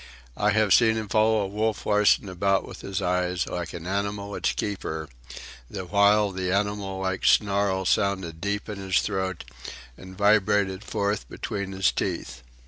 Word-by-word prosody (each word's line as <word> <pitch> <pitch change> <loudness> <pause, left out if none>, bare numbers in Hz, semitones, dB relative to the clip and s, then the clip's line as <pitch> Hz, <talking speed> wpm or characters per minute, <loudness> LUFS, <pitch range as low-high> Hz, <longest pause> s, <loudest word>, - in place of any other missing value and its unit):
I 105 - +1
have 105 -2 +3
seen 110 +1 +5
him 110 -2 -4
follow 110 0 +3
Wolf 105 +2 -2
Larsen 105 -1 +3
about 95 +1 0
with - - -10
his 100 0 -3
eyes, 90 0 0
like 85 -1 -4
an 85 -1 -7
animal 100 +1 -3
its - - 0
keeper, 80 -6 -4 0.6
the 95 - -6
while 100 +2 +3
the 90 -1 -2
animal 100 -1 -1
like 95 0 -2
snarl 100 -2 +2
sounded 95 -5 0
deep 100 +1 -2
in 105 -2 -6
his 95 -2 +1
throat 95 -3 -3 0.5
and 95 +4 -12
vibrated 100 -1 +2
forth 100 -1 -2
between 100 -3 -4
his 95 -1 +2
teeth. - - -4
100 Hz, 155 wpm, -25 LUFS, 95-105 Hz, 0.6 s, seen